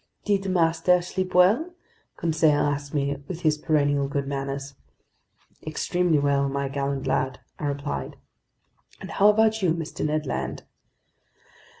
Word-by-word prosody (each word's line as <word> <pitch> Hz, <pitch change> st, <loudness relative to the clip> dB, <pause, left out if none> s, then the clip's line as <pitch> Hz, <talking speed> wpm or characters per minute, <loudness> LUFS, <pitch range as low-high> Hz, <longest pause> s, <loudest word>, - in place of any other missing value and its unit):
"Did 195 Hz, -2 st, +1 dB
master 170 Hz, 0 st, +3 dB
sleep 185 Hz, +1 st, -3 dB
well?" 225 Hz, -, +4 dB, 0.4 s
Conseil 160 Hz, -2 st, +2 dB
asked 145 Hz, -1 st, -1 dB
me 140 Hz, -1 st, -1 dB
with 175 Hz, -2 st, -6 dB
his 155 Hz, -2 st, +2 dB
perennial 145 Hz, -2 st, +1 dB
good 140 Hz, 0 st, -2 dB
manners. 140 Hz, 0 st, -4 dB, 0.9 s
"Extremely 170 Hz, +1 st, 0 dB
well, 140 Hz, -1 st, +2 dB
my 140 Hz, 0 st, -2 dB
gallant 140 Hz, 0 st, -2 dB
lad," 130 Hz, -1 st, 0 dB, 0.2 s
I 150 Hz, -, -2 dB
replied. 140 Hz, -, -4 dB, 0.8 s
"And -, -, -8 dB
how 205 Hz, +1 st, +5 dB
about 220 Hz, +1 st, +3 dB
you, 170 Hz, -4 st, +2 dB
Mr. 165 Hz, -2 st, -5 dB
Ned 155 Hz, 0 st, 0 dB
Land?" 135 Hz, -, -4 dB
150 Hz, 130 wpm, -25 LUFS, 140-180 Hz, 0.9 s, how